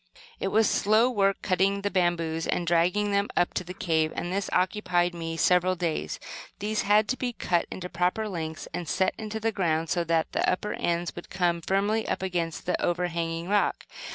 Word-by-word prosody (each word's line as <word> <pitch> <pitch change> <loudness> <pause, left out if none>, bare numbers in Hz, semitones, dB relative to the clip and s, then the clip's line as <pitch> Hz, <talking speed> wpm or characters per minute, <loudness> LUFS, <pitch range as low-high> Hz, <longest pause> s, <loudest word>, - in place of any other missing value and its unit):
It - - -1
was 215 +2 +3
slow 220 +4 +3
work 195 -4 +1
cutting 195 +1 +1
the 205 - 0
bamboos 170 -3 0
and 175 - 0
dragging 175 +5 +2
them 200 0 +2
up 175 - +2
to - - -2
the 180 +1 -8
cave, 160 -4 +1
and 175 +1 -3
this 200 0 -1
occupied 180 -2 +1
me 165 -1 -4
several 180 +2 +3
days. 165 - -2 0.4
These 210 +1 -1
had 210 +1 +4
to 255 - 0
be 245 -2 -2
cut 175 -6 0
into 185 - -6
the 180 - -6
proper 180 +5 0
lengths, 160 -5 -5
and 175 -2 -4
set 190 - +1
into 220 0 -4
the 225 +1 0
ground, 165 -5 0
so 175 - +1
that 165 -1 +1
the - - +1
upper 210 +3 -2
ends 170 0 -1
would 175 - -9
come 175 -2 0
firmly 205 +5 0
up - - -2
against 175 -3 -2
the 180 - -1
overhanging 170 -1 -1
rock. 205 +1 +1
180 Hz, 200 wpm, -27 LUFS, 170-200 Hz, 0.4 s, had